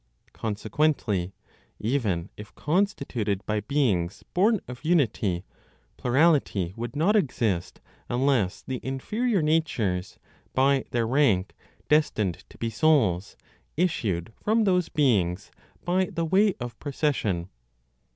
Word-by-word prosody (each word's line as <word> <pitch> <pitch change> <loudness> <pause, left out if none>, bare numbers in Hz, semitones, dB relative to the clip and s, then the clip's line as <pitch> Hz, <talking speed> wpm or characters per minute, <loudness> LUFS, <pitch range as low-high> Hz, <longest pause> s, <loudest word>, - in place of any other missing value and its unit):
Consequently, 105 - -1 0.4
even 105 -8 -1
if 105 -1 -11
constituted 140 - -1
by 105 0 0
beings 105 -7 0
born 210 +4 +3
of 125 +2 -9
unity, 110 - +1 0.5
plurality 130 - +2
would 120 +1 -5
not 175 +9 +3
exist, 115 - 0 0.3
unless 120 -6 +1
the 130 -2 -4
inferior 200 - -1
natures, 125 - 0 0.4
by 135 0 +3
their 120 -1 0
rank 110 -7 +2 0.3
destined 110 - +1
to - - -16
be 115 -1 -2
souls, 110 - +2 0.4
issued 110 - -1
from 220 +2 +2
those 180 -4 +2
beings 100 - +1 0.3
by 185 +2 +2
the 170 -3 -3
way 195 +4 +3
of 120 -1 -6
procession. 130 - -1
125 Hz, 110 wpm, -26 LUFS, 100-155 Hz, 0.5 s, born